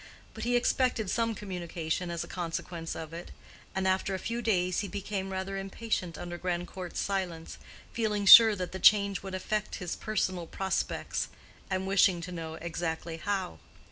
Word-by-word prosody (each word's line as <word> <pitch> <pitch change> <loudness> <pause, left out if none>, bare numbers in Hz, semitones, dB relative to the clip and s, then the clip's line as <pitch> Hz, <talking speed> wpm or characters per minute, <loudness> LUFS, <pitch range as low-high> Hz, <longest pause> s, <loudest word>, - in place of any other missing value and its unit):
But - - -5
he 245 0 +2
expected 245 -4 +1
some 230 -1 0
communication 175 -3 -3
as 170 -1 -2
a - - -9
consequence 170 -1 -4
of 160 0 -7
it, 170 +1 -7 0.5
and 190 0 +1
after 190 +1 +1
a - - -1
few 235 +5 -3
days 185 -5 +1
he 205 - -2
became 195 0 -4
rather 190 +1 -3
impatient 195 -3 -3
under 175 0 -6
Grandcourt's 180 0 -3
silence, 180 -5 -3 0.3
feeling 210 -3 0
sure 220 +2 +11
that 180 -2 -4
the 190 - -5
change 200 0 +5
would 190 -1 -5
affect 210 +3 -2
his 180 -2 -4
personal 185 -5 -2
prospects, 190 +2 -2 0.4
and 190 0 -1
wishing 190 -2 +4
to 180 +2 -6
know 165 -2 -5
exactly 165 0 -4
how. 190 - -2
190 Hz, 165 wpm, -30 LUFS, 175-200 Hz, 0.5 s, sure